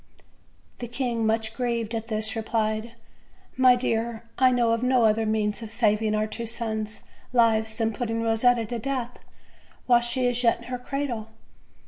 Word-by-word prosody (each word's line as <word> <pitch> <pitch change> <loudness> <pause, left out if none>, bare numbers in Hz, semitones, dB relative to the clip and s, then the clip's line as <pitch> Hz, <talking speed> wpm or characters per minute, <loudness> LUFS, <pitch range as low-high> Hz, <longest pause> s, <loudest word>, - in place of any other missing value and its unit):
The 240 - -5
king, 240 -2 -1
much 220 0 0
grieved 235 -2 -2
at 225 0 -3
this, 220 -1 -2
replied: 220 0 -1 0.6
"My 255 -1 +6
dear., 230 -2 -2
I 260 0 +5
know 240 -2 +2
of 230 0 +1
no 250 -2 +3
other 220 0 +2
means 215 0 0
of 220 -2 -7
sav 220 -2 +2
ing 215 -1 +1
our 215 0 +1
two 230 +2 -5
sous' 220 -2 -4 0.3
lives 220 -2 +3
than 225 -1 0
putting 230 0 -2
Kosetta 230 +1 +3
to 235 +2 -4
death 250 -1 -3 0.7
while 240 -1 +5
she 250 +2 0
is 245 0 +1
yet 230 -2 +3
in 235 - -14
her 250 - -2
cradle." 250 -4 -3
230 Hz, 170 wpm, -26 LUFS, 220-245 Hz, 0.7 s, My